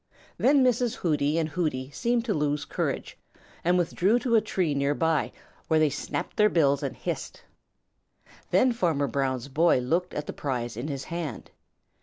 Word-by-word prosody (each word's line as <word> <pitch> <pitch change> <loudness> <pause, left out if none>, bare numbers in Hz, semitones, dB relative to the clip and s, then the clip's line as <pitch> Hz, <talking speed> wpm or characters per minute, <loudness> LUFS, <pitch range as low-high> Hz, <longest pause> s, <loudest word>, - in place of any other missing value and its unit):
Then 275 +1 +5
Mrs. 245 -2 +2
Hooty 150 -2 0
and 160 -2 +1
Hooty 145 -5 -2
seemed 235 - 0
to 220 - 0
lose 150 -2 -1
courage - - -3 0.4
and 175 +2 +3
withdrew 180 +5 +2
to 245 -1 -1
a 220 - +5
tree 185 -7 -1
near 140 +1 +1
by, 160 -2 +1 0.4
where 160 -1 +3
they 155 -2 +3
snapped 145 - -4
their 210 0 +5
bills 140 -6 +2
and - - -3
hissed. - - -5 1.1
Then 255 - +4
Farmer 170 -11 +1
Brown's 130 -1 -1
boy 160 +4 +3
looked 165 +9 -1
at 150 - -3
the - - -5
prize 120 -5 -3
in 120 +6 -4
his 140 -3 -4
hand. 165 -7 -5
155 Hz, 170 wpm, -27 LUFS, 140-185 Hz, 1.1 s, Then